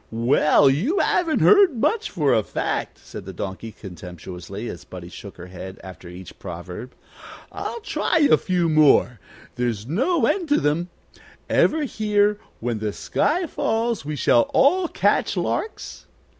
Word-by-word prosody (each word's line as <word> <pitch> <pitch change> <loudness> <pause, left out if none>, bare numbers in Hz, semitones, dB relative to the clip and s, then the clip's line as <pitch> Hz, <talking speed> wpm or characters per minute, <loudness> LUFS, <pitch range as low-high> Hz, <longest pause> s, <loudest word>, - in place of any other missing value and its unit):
Well, 125 +5 +3
you 190 - +1
haven't 345 -5 +1
heard 400 - +6
much, 440 - 0
for 150 -7 +1
a 110 - +3
fact," - - -3
said - - -10
the - - -7
Donkey, 100 +3 -6
contemptuously, 90 +2 -9
as 85 - -7
Buddie 90 -1 -10
shook 95 +3 -11
her 90 - -9
head 95 +1 -9
after 95 -2 -11
each 90 +1 -11
proverb. 90 +6 -8 0.6
"I'll 470 - -5
try 415 - 0
a 290 - +6
few 180 -2 0
more; 150 -6 +4 0.4
there's 120 -4 -2
no 260 - +1
end 355 -6 0
to 290 - +4
them. 160 +5 0 0.6
Ever 315 -1 +3
hear, 210 -4 +1 0.2
When 115 -1 -2
the 105 -1 -3
sky 345 - 0
falls 230 - -1
we 150 +1 -4
shall 120 -3 +3
all 350 +6 +4
catch - - +1
larks? 440 - -4
145 Hz, 150 wpm, -23 LUFS, -, 0.6 s, heard